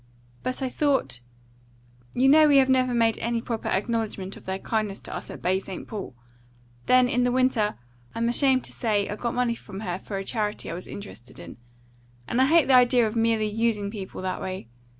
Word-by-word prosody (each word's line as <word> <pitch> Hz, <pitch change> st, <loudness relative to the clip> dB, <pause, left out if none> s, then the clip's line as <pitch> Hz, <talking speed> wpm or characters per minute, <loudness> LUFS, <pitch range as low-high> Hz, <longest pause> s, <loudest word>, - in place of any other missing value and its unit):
But 255 Hz, +1 st, -3 dB
I 260 Hz, -, -1 dB
thought 275 Hz, -, 0 dB, 1.0 s
You 260 Hz, +2 st, +3 dB
know 305 Hz, +2 st, +7 dB
we 285 Hz, -1 st, +5 dB
have 265 Hz, -1 st, +5 dB
never 255 Hz, -1 st, +3 dB
made 230 Hz, -2 st, +2 dB
any 235 Hz, +1 st, -1 dB
proper 230 Hz, -1 st, -4 dB
acknowledgment 205 Hz, -2 st, -2 dB
of -, -, -15 dB
their 190 Hz, 0 st, -2 dB
kindness 215 Hz, -1 st, -2 dB
to -, -, -7 dB
us -, -, -7 dB
at -, -, -9 dB
Baie 185 Hz, +1 st, +2 dB
St. 190 Hz, -2 st, -8 dB
Paul. 200 Hz, -, -7 dB, 0.7 s
Then 255 Hz, 0 st, +5 dB
in 245 Hz, 0 st, +1 dB
the 245 Hz, 0 st, +2 dB
winter, 250 Hz, -4 st, +1 dB, 0.4 s
I'm 230 Hz, 0 st, 0 dB
ashamed 260 Hz, +1 st, +3 dB
to -, -, -8 dB
say, 210 Hz, -4 st, 0 dB
I 205 Hz, -, -4 dB
got 235 Hz, +2 st, -3 dB
money 245 Hz, -1 st, +1 dB
from 205 Hz, -3 st, -9 dB
her 180 Hz, -3 st, -3 dB
for 195 Hz, -, -6 dB
a 195 Hz, -, -3 dB
charity 210 Hz, -2 st, -3 dB
I -, -, -4 dB
was 180 Hz, +2 st, -7 dB
interested 200 Hz, -, -10 dB
in; 85 Hz, -1 st, -10 dB, 0.7 s
and 245 Hz, -, +1 dB
I 265 Hz, -, +5 dB
hate 330 Hz, +1 st, +5 dB
the 270 Hz, -, +3 dB
idea 245 Hz, -1 st, +5 dB
of 215 Hz, +1 st, -3 dB
merely 225 Hz, -1 st, +2 dB
USING 210 Hz, -1 st, 0 dB
people 195 Hz, -4 st, -7 dB
in -, -, -9 dB
that 185 Hz, -1 st, -3 dB
way. 185 Hz, -10 st, -5 dB
230 Hz, 210 wpm, -25 LUFS, 200-250 Hz, 1.0 s, know